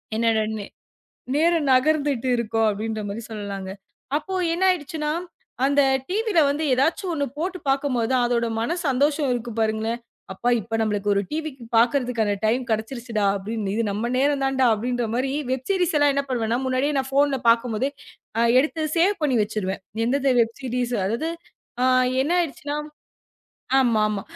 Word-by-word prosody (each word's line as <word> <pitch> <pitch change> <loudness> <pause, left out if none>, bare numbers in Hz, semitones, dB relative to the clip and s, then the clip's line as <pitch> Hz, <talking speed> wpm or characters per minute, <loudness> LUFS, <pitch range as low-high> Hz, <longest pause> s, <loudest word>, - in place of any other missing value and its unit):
என்னோட 225 -1 +2 0.9
நேரம் 325 -1 +2
நகர்ந்துட்டு 280 -1 +2
இருக்கும் 225 -1 +1
அப்படின்ற 215 +1 -3
மாரி 210 +3 -5
சொல்லலாங்க. 200 -3 -5 0.5
அப்போ 310 +5 -6 0.2
என்ன 350 +3 -1
ஆயிடுச்சுனா, 300 -3 -3 0.5
அந்த 285 +1 +4 0.3
டிவில 420 -1 +1
வந்து 290 +3 -1
எதாச்சும் 325 +8 +1
ஒண்ணு 285 -3 0
போட்டுப் 365 -2 -4
பாக்கும்போது, 265 -3 +1
அதோட 235 -1 +1
மன 280 +10 -1
சந்தோஷம் 285 +2 +2
இருக்கும் 235 -2 -5
பாருங்களேன். 220 +1 0 0.3
அப்பா 235 +6 -1
இப்ப 225 +2 -3
நம்மளுக்கு 205 -1 0
ஒரு 200 - +2
டிவி 310 0 -3 0.3
பாக்குறதுக்கு 235 -3 +2
டைம் 245 +4 +1
கிடைச்சுடுச்சுடா 225 -1 -2
அப்படின்னு. 205 0 -3
இது 230 - +1
நம்ம 215 +4 -2
நேரம் 280 +1 +2
தான்டா 265 -1 +2
அப்படின்ற 245 +3 -2
மாரி 260 +2 0 0.2
வெப் 260 0 -3
சீரிஸ் 360 -4 +1
எல்லாம் 290 -1 +4
என்ன 280 - +1
பண்ணுவேன். 230 -2 0
முன்னாடியே 260 +3 0
நான் 265 0 -4
போன்ல 280 -1 +3
பாக்கும்போதே 235 +3 +1 0.7
எடுத்து 315 +3 -1 0.2
சேவ் 365 +2 +2
பண்ணி 275 -4 +2
வச்சிருவேன். 205 -3 -3 0.3
எந்த 275 +1 +2
வெப் 230 0 -2
சீரிஸ் 250 -1 -2
அதாவது 235 +11 -1 0.9
என்ன 300 - -1
ஆயிடுச்சுன்னா. 290 -2 -4 1.0
ஆமாமா. 215 -5 +2
255 Hz, 140 wpm, -23 LUFS, 225-290 Hz, 1.0 s, அந்த